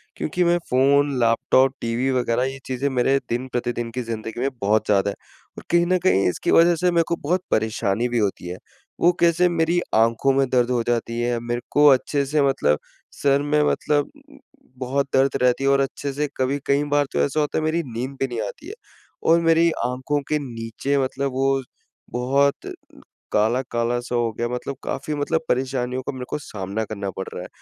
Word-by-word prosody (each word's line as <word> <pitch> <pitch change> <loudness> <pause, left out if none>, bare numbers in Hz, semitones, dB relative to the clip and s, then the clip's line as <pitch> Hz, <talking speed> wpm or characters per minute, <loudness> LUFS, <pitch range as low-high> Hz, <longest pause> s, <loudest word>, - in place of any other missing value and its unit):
क्योंकि 180 +4 -1
मैं 175 0 +3
phone, 140 +3 +3
laptop, 125 +3 +3
TV 120 +3 -1
वगैरह 125 -1 +1
ये 135 +1 -3
चीज़ें 130 +2 -2
मेरे 130 +1 +2
दिन 120 +2 -2
प्रतिदिन 120 -2 -3
की 125 +2 -3
ज़िंदगी 115 0 -5
में 135 - +1
बहुत 105 +2 +2
ज़्यादा 100 -1 +2
है - - -9 0.4
और - - -8
कहीं 170 0 +4
न 185 - +3
कहीं 100 - +3
इसकी - - -2
वजह 170 +1 +6
से 180 +2 +1
मेरे 170 -1 +3
को 170 - 0
को - - -21
बहुत 175 +5 0
परेशानी 110 +1 0
भी 120 - -1
होती 100 -4 -2
है। 90 +1 -5 0.4
वो 175 - +5
कैसे? 170 +1 +4
मेरी 170 0 +1 0.2
आँखों 115 +4 +3
में 135 0 +2
दर्द 125 -1 +2
हो 120 -1 +1
जाती 115 -1 -1
है, 120 0 0
मेरे 120 +1 -3
को 150 0 +5
अच्छे 140 +1 +3
से 150 +2 +1
मतलब 75 - +1 0.4
सर 140 0 +3
में 150 +1 +1
मतलब 145 -1 0 0.7
बहुत 135 +2 -1
दर्द 135 +1 +4
रहती 125 +1 +2
है 135 - +3
और 140 0 +4
अच्छे 140 +1 -3
से 150 +2 -1
कभी 130 +2 0
कई 140 +1 +2
बार 145 0 +3
तो - - 0
ऐसा 115 - 0
होता 150 -1 0
है 155 - 0
मेरी 160 +2 +1
नींद 125 +1 -4
भी 135 - 0
नहीं 120 -3 -4
आती 295 - -10
है 400 - -6 0.6
और 170 - +5
मेरी 165 0 +4 0.2
आँखों 130 +4 -1
के 150 - +1
नीचे 120 +1 -3
मतलब 135 +1 -2
वो 135 +1 +1 0.5
बहुत 140 +3 +1 0.6
काला-काला 120 +2 0
सा 120 0 -4
हो 120 -1 +1
गया 120 +2 -2
मतलब 125 +3 -4
काफ़ी 155 - -3
मतलब 155 +3 0
परेशानियों 130 0 -1
का - - -3
मेरे 130 -2 -7
को - - -2
सामना 100 -4 -4
करना 100 -2 -5
पड़ 95 - -3
रहा - - -5
है - - -8
130 Hz, 200 wpm, -22 LUFS, 120-145 Hz, 0.7 s, वजह